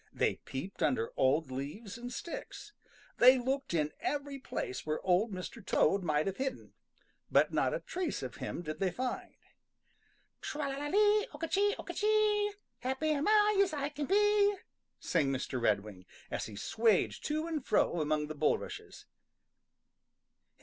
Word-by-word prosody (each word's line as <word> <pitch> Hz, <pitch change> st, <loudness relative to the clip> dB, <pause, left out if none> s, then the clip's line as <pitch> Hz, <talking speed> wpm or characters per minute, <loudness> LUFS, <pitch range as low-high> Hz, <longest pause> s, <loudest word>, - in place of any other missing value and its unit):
They -, -, 0 dB
peeped 175 Hz, +9 st, -7 dB
under 115 Hz, -3 st, +1 dB
old 135 Hz, +2 st, +2 dB
leaves 150 Hz, -, -6 dB
and 245 Hz, +1 st, -7 dB
sticks. 415 Hz, -, -7 dB, 0.5 s
They 255 Hz, +2 st, +8 dB
looked 265 Hz, +2 st, -2 dB
in 150 Hz, -3 st, 0 dB
every 285 Hz, -5 st, -3 dB
place 130 Hz, -, -4 dB
where 155 Hz, 0 st, -2 dB
Old 190 Hz, +5 st, +3 dB
Mr. 190 Hz, +4 st, -7 dB
Toad 195 Hz, +1 st, +2 dB
might 155 Hz, -3 st, +1 dB
have 195 Hz, -1 st, -2 dB
hidden, 265 Hz, -1 st, -4 dB, 0.6 s
but -, -, +3 dB
not -, -, +2 dB
a -, -, -4 dB
trace 365 Hz, -1 st, -3 dB
of -, -, -6 dB
him 175 Hz, -, -5 dB
did 155 Hz, -1 st, -5 dB
they 195 Hz, -, +2 dB
find. 250 Hz, +7 st, -4 dB, 1.1 s
"Tra 295 Hz, -2 st, -3 dB
la 270 Hz, -, -4 dB
la 290 Hz, +1 st, -3 dB
lee! 420 Hz, +5 st, +4 dB
Oka 330 Hz, +3 st, -3 dB
chee! 410 Hz, +4 st, +2 dB
Oka -, -, -7 dB
chee! 420 Hz, -1 st, +2 dB, 0.3 s
Happy 265 Hz, +5 st, -1 dB
am 295 Hz, +2 st, 0 dB
I 420 Hz, -1 st, +5 dB
as 385 Hz, -4 st, +1 dB
I 285 Hz, -1 st, -1 dB
can 290 Hz, -1 st, -4 dB
be!" 410 Hz, 0 st, +4 dB, 0.4 s
sang 140 Hz, -, +1 dB
Mr. 130 Hz, -1 st, -2 dB
Redwing, 100 Hz, -4 st, -1 dB, 0.2 s
as -, -, -2 dB
he 110 Hz, -, -9 dB
swayed 220 Hz, -, +2 dB
to 310 Hz, +1 st, -1 dB
and 320 Hz, -4 st, -3 dB
fro 175 Hz, -7 st, +2 dB
among 150 Hz, 0 st, 0 dB
the 155 Hz, -, -6 dB
bulrushes. 150 Hz, -, -2 dB
255 Hz, 160 wpm, -32 LUFS, -, 1.1 s, They